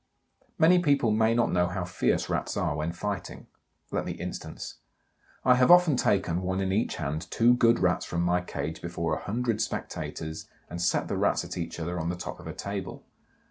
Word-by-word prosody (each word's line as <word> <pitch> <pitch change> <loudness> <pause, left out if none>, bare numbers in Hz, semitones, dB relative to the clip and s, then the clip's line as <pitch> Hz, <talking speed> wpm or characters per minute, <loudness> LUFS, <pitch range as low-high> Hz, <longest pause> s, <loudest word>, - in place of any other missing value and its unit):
Many 175 +2 +6
people 140 -8 +3
may 110 +1 +3
not 120 - +2
know 90 0 +2
how 90 0 -3
fierce 90 - 0
Rats - - -2
are 75 - 0
when 75 +2 -1
fighting. 100 +2 -5 0.5
Let - - -1
me - - -4
instance. - - -7 0.7
I 125 - +7
have 125 0 +4
often 175 -4 +7
taken, 100 -8 +1
one 95 +1 -1
in 95 -1 0
each 105 +4 0
hand, 75 +4 -4
two 120 +1 +4
good 120 -1 +4
Rats 90 -1 +1
from 85 0 -1
my 90 0 +2
cage 80 -2 -5
before 85 -1 -2
a - - -6
hundred 115 0 -1
spectators 80 -6 -4 0.2
and 85 +1 -4
set 90 - +1
the - - -2
Rats - - +1
at - - -6
each 85 -1 -5
other 85 +2 -3
on 80 +1 -2
the 90 - -2
top 90 - -7
of - - -10
a - - -5
table. 100 -2 -5
95 Hz, 200 wpm, -28 LUFS, 85-115 Hz, 0.7 s, I